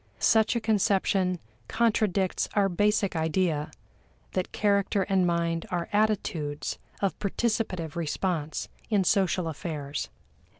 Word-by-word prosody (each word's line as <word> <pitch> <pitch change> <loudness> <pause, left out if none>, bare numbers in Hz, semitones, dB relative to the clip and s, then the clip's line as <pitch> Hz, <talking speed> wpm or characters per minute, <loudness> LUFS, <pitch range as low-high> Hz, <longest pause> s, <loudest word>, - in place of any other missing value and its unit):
Such 220 +1 +3
a - - +2
conception 195 -3 +2 0.3
contradicts 210 -5 +1
our 200 -2 +3
basic 205 +1 +1
idea 160 -1 0 0.6
that 185 -1 -2
character 200 -1 +2
and 190 -2 +2
mind 170 -1 0
are 175 -2 -2
attitudes 185 -9 0 0.2
of 195 - 0
participative 200 -6 -1
response 165 -1 -2 0.2
in 205 -4 +3
social 185 -2 +2
affairs. 150 -2 -4
185 Hz, 110 wpm, -28 LUFS, 165-205 Hz, 0.6 s, Such